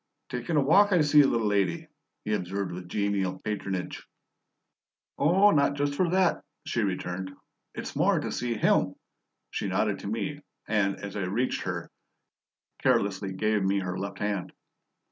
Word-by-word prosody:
"Takin' 125 +6 -2
a - - +5
walk, 200 +9 +5
I 175 - +5
see, 150 0 +6
little 115 -5 +2
lady," 105 - 0 0.4
he 105 - 0
observed 100 0 -2
with 90 0 -7
genial 100 -2 0
patronage. 95 -3 -4 1.2
"Oh, 190 +8 +5
not 140 -3 +3
just 145 0 0
for 175 +4 +1
that," 185 0 +2 0.2
she 120 -7 -1
returned. 95 -1 -2 0.5
"It's - - -6
more - - +3
to - - -4
see 120 -1 -2
HIM." 110 - +2 0.6
She - - -2
nodded 100 +2 0
to - - -7
me, 115 +8 -3 0.3
and, 100 -3 +1
as 100 -1 -8
I 100 -3 -1
reached 115 +8 -1
her, - - -4 0.9
carelessly 100 -1 +1
gave 105 +2 +1
me 95 +1 +2
her 90 -1 -3
left 100 +2 -5
hand. 105 -3 -2
105 Hz, 155 wpm, -28 LUFS, 95-140 Hz, 1.2 s, see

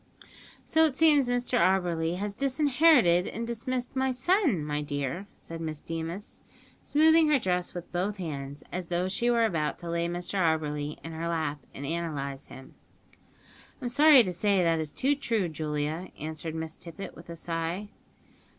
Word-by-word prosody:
"So 320 0 +4
it 280 - -5
seems 295 -4 +5
Mr 245 0 +1
Auberly 175 -2 +2
has 205 +1 -3
disinherited 265 - +4
and 230 +2 -4
dismissed 240 +2 -3
his 265 -1 0
son, 295 - +2
my 150 0 -2
dear," 145 +5 -3
said 165 0 -8
Miss 155 -2 -4
Deemas, 165 +6 -6 0.4
smoothing 320 +1 +5
her 300 - +5
dress 180 -7 -1
with 175 -1 -7
both 190 +4 -1
hands, 145 -5 -6
as 180 -1 -4
though 175 +1 0
she 205 +6 0
were 235 -1 +4
about 160 -8 -1
to 170 -1 -6
lay 170 0 0
Mr 175 +3 -3
Auberly 150 -3 0
in 165 - -6
her 165 +1 -4
lap, 155 -3 -1
and 140 - -7
analyse 145 -4 -3
him. 130 0 -12 1.1
"I'm 250 -4 -3
sorry 285 0 +7
to 185 -3 -3
say 195 +1 +2
that 165 -1 +2
it - - 0
is 155 -2 -4
too 275 +2 +1
true, 230 -9 0
Julia," 155 +2 -3
answered 160 +1 -5
Miss 160 0 -5
Tippet, 170 +3 -9
with 170 +1 -13
a 170 - -6
sigh. 165 +4 -3
175 Hz, 170 wpm, -28 LUFS, 160-240 Hz, 1.1 s, sorry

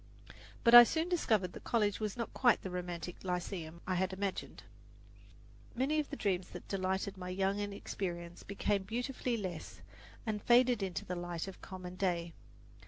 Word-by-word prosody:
But 235 - +5
I 240 0 +14
soon 320 +7 0
discovered 215 - +1
that - - -10
college 210 -4 +1
was 215 -1 -3
not 235 - -4
quite 245 -3 +4
the 190 - -4
romantic 180 -1 -5
lyceum 175 -2 -4
I 185 - -1
had 185 +1 +1
imagined. 195 0 -4 1.1
Many 275 +5 +1
of 300 - -2
the - - -4
dreams 190 -7 0
that - - -9
had - - -23
delighted 190 0 -1
my 180 -1 -6
young 195 +2 0
inexperience 175 -4 -4
became 200 0 0
beautifully 245 +4 -2
less 185 -6 -6 0.4
and 215 -2 -2
"faded 245 -1 +5
into 190 -2 -3
the 180 - -3
light 175 0 -4
of 195 - -9
common 185 -1 -8
day." 175 -3 0
195 Hz, 170 wpm, -34 LUFS, 180-225 Hz, 1.1 s, I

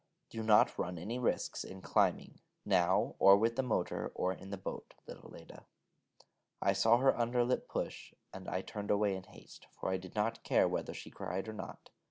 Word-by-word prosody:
Do 115 - -4
not 110 -1 +4
run 90 0 -2
any 110 +9 -4
risks 125 - -1
in 95 0 -10
climbing, - - +1 0.3
now, 85 -1 +2
or 100 0 +8
with 115 +3 +1
the 135 - +1
motor, 125 -3 -2
or 90 0 0
in 95 - -11
the 100 - -4
boat... 95 - -7
little - - -11
Leda - - -13 0.5
...' - - -28 0.3
I 100 - +2
saw 110 +4 +4
her 135 +2 +4
under 120 +1 +1
lip 125 - -1
push, - - -4 0.2
and 95 -1 -9
I 95 - -1
turned 105 +1 -7
away 105 -1 +2
in 95 -1 -8
haste, - - -15
for - - -2
I 95 - +1
did 95 +2 -11
not 110 +2 0
care - - +3
whether - - -3
she - - -9
cried 95 +4 -4
or 110 - -5
not. 105 - -9
105 Hz, 205 wpm, -34 LUFS, 95-115 Hz, 0.5 s, or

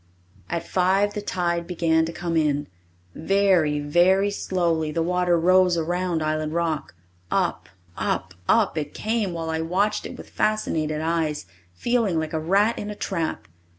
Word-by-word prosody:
At 170 - -3
five 190 +3 +2
the 210 - -4
tide 170 -3 -1
began 160 -2 +2
to 165 - -4
come 170 0 -3
in. 145 -2 +1 0.5
Very, 180 -4 +2
very 180 +7 +3
slowly 170 -5 0
the 165 +1 0
water 180 0 +2
rose 180 0 +4
around 175 0 -1
Island 155 0 -1
Rock. 160 - -2 0.3
Up, - - -1 0.3
up, - - -2 0.2
up 205 -8 +3
it 145 -1 -6
came, 215 -3 -1
while 165 -1 -3
I 160 0 -1
watched 195 +6 0
it - - -9
with - - -12
fascinated 155 -8 0
eyes, 160 - -1 0.3
feeling 225 - +1
like 160 0 -2
a 160 - 0
rat 200 +8 +2
in 205 - -5
a 210 - -5
trap. 170 -6 -3
170 Hz, 155 wpm, -24 LUFS, 160-190 Hz, 0.5 s, rose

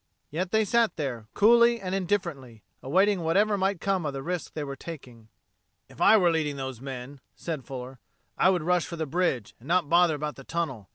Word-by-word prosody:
Yet 175 +5 -2
they 220 0 +3
sat 230 -1 +2
there, 125 -8 -4
coolly 235 +2 +5
and 185 -2 -4
indifferently, 170 - -2 0.2
awaiting 190 +7 +2
whatever 200 +6 +2
might 195 -1 0
come 195 -1 0
of 145 -2 -3
the 135 0 -5
risk 175 +1 -4
they 155 - -3
were 140 -1 -5
taking. 125 -8 -10 0.6
"If - - -13
I 220 - +7
were 180 -4 +4
leading 155 -3 -1
those 130 -3 -6
men," 135 +1 -7 0.2
said 155 -6 -5
Fuller, 130 -1 -8 0.4
"I - - +4
would 180 -4 +1
rush 180 0 +1
for 170 - -6
the 160 -1 -3
bridge, 145 - -1
and 125 - -15
not 170 -3 +1
bother 170 -1 +4
about 150 0 -4
the 135 - -10
tunnel. 135 - -4
165 Hz, 205 wpm, -27 LUFS, 135-185 Hz, 0.6 s, I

